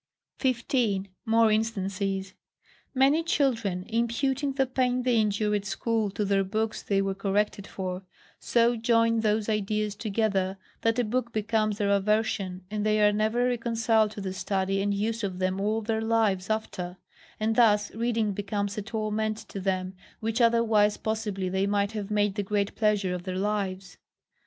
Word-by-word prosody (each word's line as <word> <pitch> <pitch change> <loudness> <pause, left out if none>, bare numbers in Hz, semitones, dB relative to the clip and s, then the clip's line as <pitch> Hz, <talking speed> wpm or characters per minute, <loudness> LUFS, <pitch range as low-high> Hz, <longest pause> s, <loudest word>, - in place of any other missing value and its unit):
15. 235 -6 0 0.2
More 225 0 +4
instances. 195 -3 -1 0.6
Many 275 +5 +4
children, 235 - 0
imputing 260 +5 0
the 270 0 +2
pain 255 -1 0
they 245 -2 +3
endured 210 0 +1
at 200 - -7
school 220 0 -1
to 205 +2 -2
their 195 0 +2
books 220 +3 -2
they 195 -1 +1
were 195 0 -1
corrected 200 +1 -1
for, 185 -1 -4 0.4
so 235 0 +2
join 230 0 +2
those 215 -1 +1
ideas 210 -1 -1
together, 200 -3 0 0.2
that 225 +1 +1
a 245 - +2
book 235 +2 -1
becomes 215 -1 0
their 205 -2 +1
aversion, 200 -2 0
and 210 -1 -2
they 215 0 +2
are 210 0 +5
never 220 +4 +1
reconciled 230 -2 +1
to 210 -1 -8
the 190 -1 -3
study 190 +1 -1
and 200 0 0
use 225 +2 -2
of 190 -2 -2
them 185 +1 -1
all 215 +2 0
their 220 0 -1
lives 220 -4 +1
after; 185 -5 -3 0.4
and 220 +1 +1
thus 210 -3 +4
reading 225 -2 0
becomes 200 0 -2
a - - -2
torment 215 0 -2
to 195 - -5
them, 185 -1 -1 0.3
which 225 +2 -1
otherwise 225 -3 +4
possibly 215 -4 -2
they 190 +2 0
might 200 0 +1
have 210 -2 -5
made 205 -1 +1
the 205 - -2
great 200 0 -1
pleasure 210 -4 +1
of 180 - -4
their 185 0 -4
lives. 195 -2 -2
210 Hz, 165 wpm, -27 LUFS, 195-225 Hz, 0.6 s, are